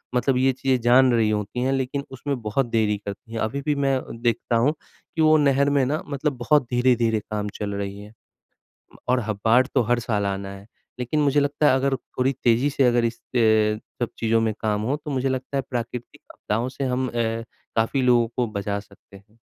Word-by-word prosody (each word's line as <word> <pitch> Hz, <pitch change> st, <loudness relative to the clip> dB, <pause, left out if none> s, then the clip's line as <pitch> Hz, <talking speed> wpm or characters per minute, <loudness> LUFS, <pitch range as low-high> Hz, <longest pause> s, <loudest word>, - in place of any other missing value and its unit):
मतलब 125 Hz, +1 st, +2 dB
ये 135 Hz, +1 st, +3 dB
चीज़ें 130 Hz, 0 st, 0 dB
जान 125 Hz, +2 st, +5 dB
रही 115 Hz, -2 st, +3 dB
होती 105 Hz, +3 st, -2 dB
हैं 130 Hz, -, +1 dB
लेकिन 135 Hz, +1 st, -2 dB
उसमें 130 Hz, 0 st, -4 dB
बहुत 110 Hz, +5 st, 0 dB
देरी 105 Hz, -2 st, +1 dB
करती 105 Hz, +3 st, -8 dB
है। 115 Hz, -, -3 dB
अभी 115 Hz, +6 st, -2 dB
भी 150 Hz, -, +2 dB
मैं 135 Hz, -1 st, +2 dB, 0.2 s
देखता 120 Hz, 0 st, 0 dB
हूँ 135 Hz, +7 st, +3 dB, 0.4 s
कि 160 Hz, -, +1 dB
वो 155 Hz, 0 st, +6 dB
नहर 140 Hz, -1 st, +3 dB
में 140 Hz, -2 st, +2 dB
ना 150 Hz, +4 st, -1 dB
मतलब 140 Hz, +1 st, -1 dB
बहुत 130 Hz, +5 st, +3 dB
धीरे-धीरे 120 Hz, -3 st, +2 dB
काम 105 Hz, 0 st, -4 dB
चल 100 Hz, -1 st, -3 dB
रही 100 Hz, 0 st, -4 dB
है, 105 Hz, +1 st, -13 dB, 0.8 s
म -, -, -14 dB
और 125 Hz, -, +3 dB
ह 110 Hz, -, +1 dB
बाढ़ 120 Hz, +3 st, +5 dB
तो 130 Hz, -, +5 dB
हर 120 Hz, +2 st, +1 dB
साल 105 Hz, -3 st, -1 dB
आना 100 Hz, 0 st, -3 dB
है। 100 Hz, 0 st, -10 dB, 0.3 s
लेकिन 125 Hz, +5 st, -1 dB
मुझे 145 Hz, 0 st, +3 dB
लगता 145 Hz, +1 st, +1 dB
है 130 Hz, -, +5 dB
अगर 135 Hz, +1 st, +1 dB
थोड़ी 130 Hz, 0 st, -2 dB
तेज़ी 120 Hz, +4 st, +3 dB
से 140 Hz, -1 st, +1 dB
अगर 120 Hz, -1 st, +3 dB
इस 115 Hz, 0 st, -2 dB
अ, 110 Hz, -3 st, +2 dB, 0.3 s
सब -, -, -18 dB
चीज़ों 115 Hz, 0 st, +2 dB
में 110 Hz, -1 st, 0 dB
काम 105 Hz, -2 st, 0 dB
हो 130 Hz, +5 st, 0 dB
तो 150 Hz, -, -3 dB
मुझे 135 Hz, 0 st, 0 dB
लगता 130 Hz, +1 st, -3 dB
है 135 Hz, -, +1 dB
प्राकृतिक 120 Hz, 0 st, -5 dB
आपदाओं 115 Hz, +4 st, -2 dB
से 135 Hz, +1 st, -5 dB
हम 130 Hz, 0 st, 0 dB
अ, -, -, -6 dB, 0.6 s
काफ़ी 115 Hz, +4 st, +1 dB
लोगों 120 Hz, -2 st, +4 dB
को 120 Hz, -2 st, +1 dB
बचा 100 Hz, 0 st, -2 dB
सकते 100 Hz, -1 st, -16 dB
हैं। 105 Hz, +3 st, -24 dB
120 Hz, 215 wpm, -23 LUFS, 110-135 Hz, 0.8 s, वो